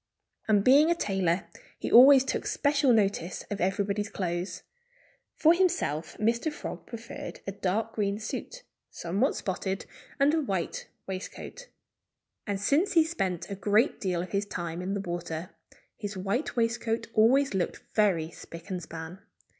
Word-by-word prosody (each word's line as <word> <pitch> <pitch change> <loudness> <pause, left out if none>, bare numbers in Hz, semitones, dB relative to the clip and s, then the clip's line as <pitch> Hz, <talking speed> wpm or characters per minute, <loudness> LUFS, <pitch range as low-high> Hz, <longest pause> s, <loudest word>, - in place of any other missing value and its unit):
And 205 -2 +4
being 285 +7 +6
a 340 - +3
tailor, 190 - 0 0.3
he - - -4
always 265 +2 +9
took - - -2
special 285 -2 +2
notice 200 -5 +1
of 205 - -3
everybody's 200 +2 0
clothes. 175 0 -3 0.7
For 325 +1 +5
himself 340 - 0
Mr. 235 +8 +1
Frog - - -7
preferred 230 0 -8
a 195 - -3
dark 200 +3 -1
green 200 -1 0
suit, - - -6 0.3
somewhat 195 - 0
spotted, 190 -1 -3 0.3
and 280 +2 +4
a 320 - +2
white 195 - -3 0.2
waistcoat. 195 - -7 0.8
And 200 -1 -1
since 285 - +2
he 330 -3 +6
spent 195 - -3
a - - -2
great 210 +6 +2
deal 180 -3 -1
of 180 - -9
his 200 +1 -1
time 170 -2 -4
in 190 +2 -2
the 200 - -2
water, 175 -1 -5 0.4
his 205 -2 -6
white 200 +10 -2
waistcoat 230 -1 0
always 255 +4 +4
looked 190 -2 -2
very 180 -7 +2
spick 170 +4 -11
and 180 -1 -2
span. 160 +2 -8
205 Hz, 150 wpm, -28 LUFS, 185-250 Hz, 0.8 s, always